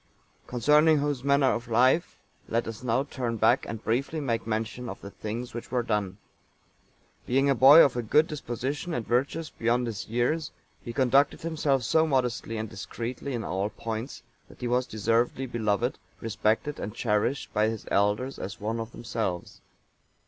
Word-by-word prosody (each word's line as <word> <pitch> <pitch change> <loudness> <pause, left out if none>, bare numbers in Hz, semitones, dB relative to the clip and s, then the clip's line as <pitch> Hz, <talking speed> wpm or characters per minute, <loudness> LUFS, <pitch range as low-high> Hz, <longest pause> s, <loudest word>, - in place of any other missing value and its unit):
Concerning 150 +6 +4
whose 145 -3 -1
manner 140 -1 +4
of 120 0 -4
life, 130 +8 +3 0.3
let 115 0 -1
us 115 +1 -6
now 125 +1 +1
turn 125 -5 -3
back, 110 +1 +3
and 110 -1 -6
briefly 135 +7 -1
make 115 -6 -2
mention 115 +2 -3
of - - -7
the 100 - -9
things 115 +4 -5
which 120 - -7
were 125 -2 0
done.(892) 105 -4 -1 1.1
Being 135 +3 +3
a - - +5
boy 135 +5 +9
of 135 - -1
a 120 - 0
good 150 +8 +4
disposition, 145 +3 -4
and 120 -3 -3
virtuous 140 +6 -1
beyond 120 +2 0
his 110 -4 -5
years, 125 +7 0 0.3
he 120 - -5
conducted 135 +3 +3
himself 150 -5 0
so 160 +7 +3
modestly 125 -5 -1
and 110 0 -3
discreetly 120 +5 -5
in 115 - -3
all 95 +2 -1
points, 115 +5 -6 0.3
that - - -16
he 125 - -1
was 125 +1 +1
deservedly 115 +4 0
beloved, 120 0 -1 0.2
respected, 110 +6 -1
and 105 +2 -5
cherished 115 +4 0
by 105 0 +3
his 110 -1 -5
elders 105 +7 +1
as 95 - -6
one 110 +2 -2
of 115 +1 -6
themselves. 110 -6 -4
120 Hz, 170 wpm, -27 LUFS, 110-135 Hz, 1.1 s, boy